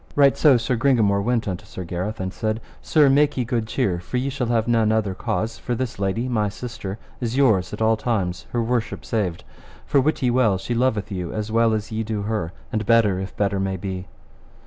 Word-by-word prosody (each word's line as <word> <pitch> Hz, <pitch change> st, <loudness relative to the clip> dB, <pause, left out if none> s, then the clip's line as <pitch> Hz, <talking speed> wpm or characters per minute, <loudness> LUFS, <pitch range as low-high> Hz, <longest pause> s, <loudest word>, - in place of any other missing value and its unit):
Right 140 Hz, -2 st, +5 dB
so 145 Hz, -5 st, +5 dB
Sir 120 Hz, +1 st, -1 dB
Gringamore 110 Hz, -6 st, +3 dB
went 115 Hz, +1 st, 0 dB
unto 90 Hz, -3 st, -3 dB
Sir 95 Hz, -, -7 dB
Gareth, 90 Hz, +5 st, -4 dB
and 95 Hz, 0 st, -3 dB
said, 110 Hz, 0 st, -2 dB, 0.2 s
Sir, 150 Hz, -3 st, +4 dB
make 140 Hz, +2 st, +3 dB
ye 125 Hz, -, 0 dB
good 115 Hz, -2 st, -1 dB
cheer, 95 Hz, -5 st, 0 dB
for 90 Hz, +8 st, -4 dB
ye 130 Hz, +2 st, 0 dB
shall 130 Hz, -3 st, -2 dB
have 115 Hz, -1 st, +1 dB
none 115 Hz, -2 st, +3 dB
other 110 Hz, -3 st, +1 dB
cause, 110 Hz, +2 st, -2 dB
for 120 Hz, -, -2 dB
this 120 Hz, -3 st, -4 dB
lady, 100 Hz, +5 st, -1 dB
my 110 Hz, -4 st, +1 dB
sister, 105 Hz, -3 st, -6 dB, 0.2 s
is 120 Hz, +1 st, -2 dB
yours 105 Hz, -10 st, +3 dB
at 105 Hz, +1 st, -2 dB
all 110 Hz, 0 st, +4 dB
times, 100 Hz, -6 st, -2 dB
her 120 Hz, -1 st, 0 dB
worship 120 Hz, 0 st, -2 dB
saved, 95 Hz, -7 st, -1 dB, 0.4 s
for 140 Hz, -, +3 dB
wit 150 Hz, 0 st, 0 dB
ye 125 Hz, -, +3 dB
well 120 Hz, -6 st, +3 dB
she 95 Hz, +6 st, -4 dB
loveth 115 Hz, -3 st, 0 dB
you 90 Hz, -3 st, -3 dB
as 110 Hz, 0 st, -4 dB
well 115 Hz, 0 st, +3 dB
as 110 Hz, 0 st, -2 dB
ye 110 Hz, 0 st, -1 dB
do 110 Hz, -2 st, -3 dB
her, 105 Hz, -6 st, -2 dB, 0.2 s
and 110 Hz, -3 st, -2 dB
better 110 Hz, -5 st, +4 dB
if 95 Hz, 0 st, -6 dB
better 100 Hz, -1 st, +1 dB
may 95 Hz, 0 st, -1 dB
be. 95 Hz, 0 st, -5 dB
110 Hz, 220 wpm, -23 LUFS, 100-120 Hz, 0.4 s, Right